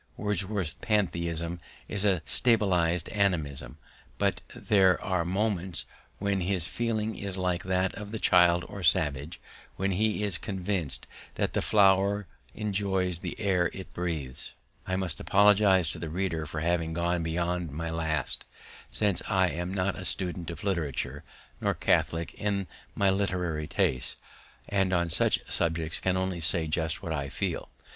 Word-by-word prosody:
Wordsworth's 100 -5 -1
pantheism 85 -5 0 0.3
is 100 - -2
a 95 -6 +3
subtilized 90 -8 +2
animism, 75 -11 0 0.4
but - - +1
there 95 -3 +4
are 95 -2 0
moments 95 -2 -1 0.3
when 100 -1 0
his 90 -2 +1
feeling 110 +1 -1
is 100 -2 0
like 90 -1 0
that 95 0 +1
of 105 -1 -7
the 110 - -4
child 90 -3 +5
or 100 - -7
savage 75 -1 +1 0.4
when 95 +1 0
he 105 +2 +1
is 100 -4 0
convinced 95 -6 -2 0.3
that - - 0
the - - +1
flower 100 0 +4 0.3
enjoys 95 -4 0
the - - -6
air 90 -5 +2
it 95 - -9
breathes. 75 -7 -4 0.3
I 95 - 0
must 95 -4 -2
apologize 100 -4 +5
to 85 - -6
the 80 -1 -4
reader 80 -2 -2
for 75 +1 -4
having 80 -1 0
gone 85 0 +1
beyond 85 +1 -1
my 80 +3 -4
last, 80 -3 -1 0.5
since 100 -4 +1
I 95 -1 +3
am 85 +2 -3
not 95 0 0
a - - -6
student 90 -2 -3
of 85 -2 -7
literature, 85 -9 -2 0.4
nor - - +1
catholic 85 0 +1
in 100 -2 -1 0.3
my 100 -1 +3
literary 90 -6 -1
tastes, 65 -1 0 0.5
and 95 -2 +1
on 85 -2 +1
such - - +2
subjects 80 -1 -1
can 95 -1 +1
only 95 -1 -1
say 80 0 +1
just 80 +2 -1
what 85 -3 -2
I 70 -2 -2
feel. - - -3
90 Hz, 150 wpm, -29 LUFS, 85-100 Hz, 0.5 s, child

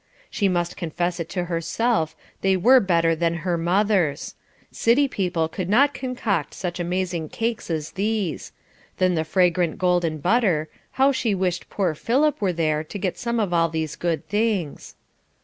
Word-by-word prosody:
She 200 - +1
must 175 -2 -1
confess 175 +1 -2
it 165 -1 -4
to 180 0 -2
herself, 170 +2 0 0.3
they 190 -1 +3
were 255 +8 +6
better 170 -5 +2
than 170 +1 0
her 175 -2 +1
mother's; 175 -2 +1 0.4
city 260 +5 +3
people 180 -8 -1
could 180 +2 -5
not 280 +7 +4
concoct 230 - -2
such 180 -2 -4
amazing 175 -2 -2
cakes 230 -3 -3
as 160 -2 -3
these; 205 -3 -2 0.5
then 185 -1 +2
the 160 -2 0
fragrant 175 0 +1
golden 175 -3 +1
butter, 175 - +1 0.2
how 270 +1 +4
she 230 -6 0
wished 180 -1 -2
poor 185 -5 0
Philip 265 - +1
were 195 -3 +2
there 155 -2 0
to 160 - -7
get 185 -2 -3
some 235 -1 -1
of 200 -5 0
all 165 -1 +3
these 160 -2 -3
good 170 -2 -2
things. 205 -7 -1
180 Hz, 165 wpm, -23 LUFS, 165-210 Hz, 0.5 s, were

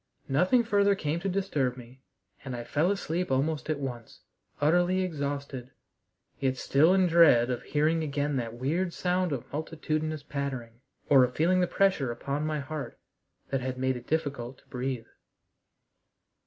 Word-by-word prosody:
Nothing 180 - +3
further 200 -3 +3
came 160 -3 -2
to 195 - -2
disturb 150 -10 0
me, 125 +1 -13 0.4
and 130 -3 -5
I 120 - -5
fell 155 +8 +1
asleep 180 -3 -1
almost 145 +4 0
at 155 - +1
once, 125 -5 -7 0.4
utterly 175 +5 +3
exhausted, 140 -6 -4 0.7
yet 130 -1 0
still 155 +9 +4
in 190 -1 +4
dread 160 -8 +5
of 125 - -2
hearing 155 +3 +1
again 145 -1 -1
that 115 -2 -3
weird 165 +9 -1
sound 180 -1 0
of 135 -4 -3
multitudinous 155 0 -2
pattering, 130 -5 -5 0.3
or 135 -3 +7
of 125 0 -1
feeling 180 +4 +3
the 180 - +2
pressure 185 -12 +2
upon 140 +5 -3
my 155 -1 -1
heart 145 +1 -6 0.5
that 135 -1 0
had 130 0 -3
made 130 0 0
it 120 0 -9
difficult 140 -5 -2
to - - -26
breathe. 125 -2 -3
145 Hz, 155 wpm, -28 LUFS, 130-170 Hz, 0.7 s, or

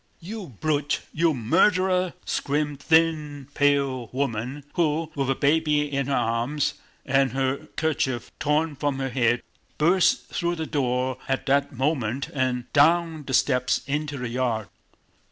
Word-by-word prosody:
"You 200 +2 -7
brute, 145 -2 0
you 165 +1 +3
murderer!" 185 - +2
screamed 145 0 -1
a - - -16
thin, 155 -4 +2
pale 140 -4 +1
woman 130 +1 -3
who, 160 -1 0
with 135 -3 -1
a 135 - +2
baby 150 +1 +2
in 140 -1 0
her 140 - +1
arms 120 +6 0 0.3
and 135 -1 +2
her 135 +3 -1
kerchief 135 -6 -1
torn 150 +1 +1
from 145 -1 -1
her 135 0 -2
head, 120 -2 +1 0.3
burst 175 +3 +3
through 175 0 -1
the 160 -1 -3
door 130 -3 -1
at 135 0 -1
that 140 +1 +2
moment 135 -1 -1
and 130 -3 0
down 160 +1 +3
the 130 - 0
steps 125 -2 +2
into 145 0 -2
the 125 -2 -4
yard. 115 -3 -1
140 Hz, 145 wpm, -25 LUFS, 130-155 Hz, 0.3 s, you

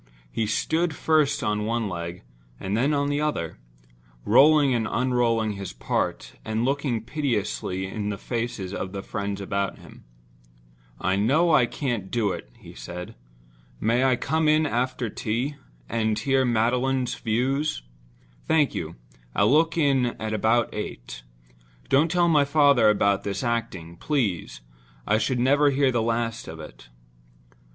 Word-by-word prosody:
He 110 - -1
stood 160 +9 0
first 155 -3 +2
on 105 0 0
one 115 -1 -1
leg 85 -1 -6 0.4
and 95 +2 -2
then 130 +6 +2
on 145 -1 +1
the 145 +1 0
other; 85 - -2 0.7
rolling 140 +4 +5
and 115 -2 0
unrolling 120 -3 +1
his 100 -7 -6
part, - - -3
and 110 +2 -1
looking 135 -4 -1
piteously 110 -8 -2
in 105 +2 -4
the 100 - -3
faces 115 -6 -4
of 95 -1 -4
the 100 -1 -5
friends 100 -1 -4
about 100 0 -2
him. - - -15 1.0
"I 95 +1 0
know 155 +11 +3
I 125 -5 +5
can't 120 -8 -3
do 110 -4 0
it," 60 - -7
he - - -13
said. 85 +9 -8 0.7
"May 115 +4 +2
I 130 -1 +4
come 155 +5 0
in 155 +1 +4
after 125 -2 -1
tea, 120 +7 -3 0.3
and 110 - 0
hear 135 +3 +2
Magdalen's 125 +2 +1
views? 130 - -1 0.6
Thank 160 -3 +3
you—I'll - - -3
look 165 +3 +3
in 135 -6 +2
about 110 +2 +1
eight. - - -6 0.7
Don't 150 +5 +4
tell 175 0 +2
my 150 -4 +4
father 140 -6 +4
about 100 -1 +2
this 100 +5 -3
acting, 95 -8 -3
please; 110 - -2 0.4
I 105 - +2
should 120 +3 0
never 145 +4 +4
hear 135 -1 +2
the 120 -2 +1
last 115 0 -2
of 80 0 -8
it." 75 -5 -12
115 Hz, 145 wpm, -25 LUFS, 100-140 Hz, 1.0 s, rolling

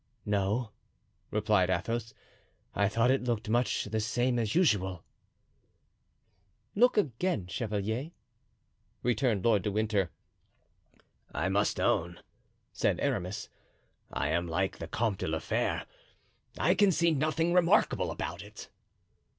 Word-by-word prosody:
"No," 105 +3 0 0.6
replied 105 -3 +2
Athos; 110 +5 -2 0.6
"I 100 -1 +2
thought 115 +4 +3
it 135 -1 +1
looked 115 -3 -1
much 120 +2 +1
the 110 - -2
same 120 +3 0
as 110 -2 -1
usual." 95 - +2 1.7
"Look, 245 +3 +4
again, 155 - 0
chevalier," 105 - -3 0.9
returned 120 -4 +1
Lord 110 -3 +3
Winter. 105 -3 0 1.2
"I 80 +6 -1
must 100 +2 +1
own," 85 +1 +1 0.5
said - - +1
Aramis, 95 +4 -2 0.6
"I 70 - -1
am 85 +2 0
like 95 +3 -1
the 80 - -5
Comte 110 +1 -1
de - - -2
la 80 0 0
Fere—I 80 - -3
can 205 -2 +4
see 170 0 +3
nothing 155 +3 +1
remarkable 180 +1 +3
about - - -4
it." - - -11
110 Hz, 115 wpm, -30 LUFS, 95-125 Hz, 1.7 s, Look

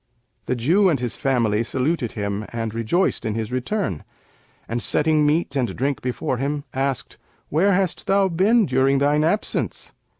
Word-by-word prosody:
The 125 - 0
Jew 175 - +3
and 150 -6 +1
his 120 -2 -3
family 120 -7 +1
saluted 130 +1 -1
him 100 -1 -3
and 115 -2 -4
rejoiced 115 - 0
in 110 -1 -2
his 110 0 -3
return 130 - -2 0.6
and, 115 +1 -2
setting 150 +2 +2
meat 150 -1 0
and 125 -4 -1
drink 140 +1 -1
before 125 0 -2
him, 140 +3 -2
asked, 135 -2 -2 0.3
'Where 190 +7 +3
hast 185 -1 -1
thou 195 0 +3
been 200 +6 +3
during 135 0 +2
thine 145 +2 +2
absence?' 185 +7 -1
135 Hz, 160 wpm, -22 LUFS, 120-165 Hz, 0.6 s, Jew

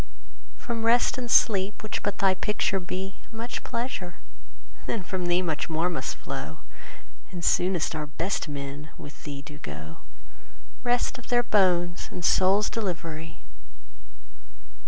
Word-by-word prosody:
From 230 -2 -3
Rest 240 +3 +4
and 245 -1 -4
Sleep, 200 -3 +4
which 215 - -2
but 205 -1 -1
thy 195 -1 +5
picture 195 0 +1
be, 185 +2 -4
5 - - -23
Much 230 +2 -4
pleasure, 230 -7 -3 0.7
then 220 -5 -1
from 180 -1 -2
thee 175 +1 +3
much 160 -2 -1
more 165 +3 +1
must - - -2
flow; - - -6 0.7
And 175 -3 -4
soonest 180 -3 +3
our 155 -1 -3
best 170 +5 -1
men 145 +1 -5
with 145 - -10
thee 140 -2 -5
do 150 0 -10
go— 75 +2 -7 0.8
Rest 245 +1 +1
of 250 - -13
their 245 -1 +4
bones 180 -5 +3
and 175 - -3
souls' 195 +3 +5
delivery! 165 -6 -3
185 Hz, 140 wpm, -27 LUFS, 165-210 Hz, 0.8 s, thy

